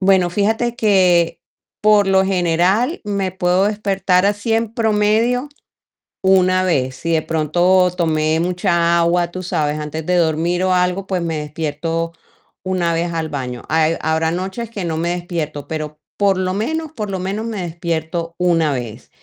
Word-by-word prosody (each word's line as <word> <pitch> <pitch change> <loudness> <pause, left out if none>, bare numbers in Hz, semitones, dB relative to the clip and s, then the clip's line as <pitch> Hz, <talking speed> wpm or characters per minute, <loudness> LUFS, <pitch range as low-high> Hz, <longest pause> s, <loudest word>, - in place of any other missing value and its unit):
Bueno, 190 -2 +4
fíjate 220 +5 0
que 185 -6 +3 0.4
por 210 -1 +4
lo 190 0 +4
general 190 - +1
me 200 -3 -2
puedo 180 +1 +2
despertar 200 -3 +1
así 205 +2 -1
en 225 0 0
promedio 225 +4 +1 0.7
una 185 -1 +4
vez, 130 -7 0
si 165 +5 -3
de 155 - +1
pronto 175 +4 +2
tomé 155 -1 +1
mucha 170 -1 +1
agua, 170 +1 +1
tú 185 - -6
sabes, 150 -4 -1
antes 155 +1 -5
de 180 - +1
dormir 170 +2 +1
o 185 - +2
algo, 180 +2 0
pues 185 -3 -1
me 165 -2 -2
despierto 160 +2 -3 0.5
una 180 -3 0
vez 170 +1 -1
al 165 -1 -3
baño, 125 -4 -5
hay 160 +1 +2
habrá 160 +1 +1
noches 190 +6 -4
que 200 -6 -5
no 160 -1 -2
me 170 +2 -1
despierto, 170 -5 -4
pero 155 -1 -5 0.2
por 200 -2 +2
lo 185 0 -1
menos 315 +10 -2
por 215 -8 -5
lo 190 - -2
menos 200 +4 -3
me 210 -5 -4
despierto 165 0 -3
una 170 -4 +2
vez, 120 -2 -6
180 Hz, 160 wpm, -19 LUFS, 160-195 Hz, 0.7 s, Bueno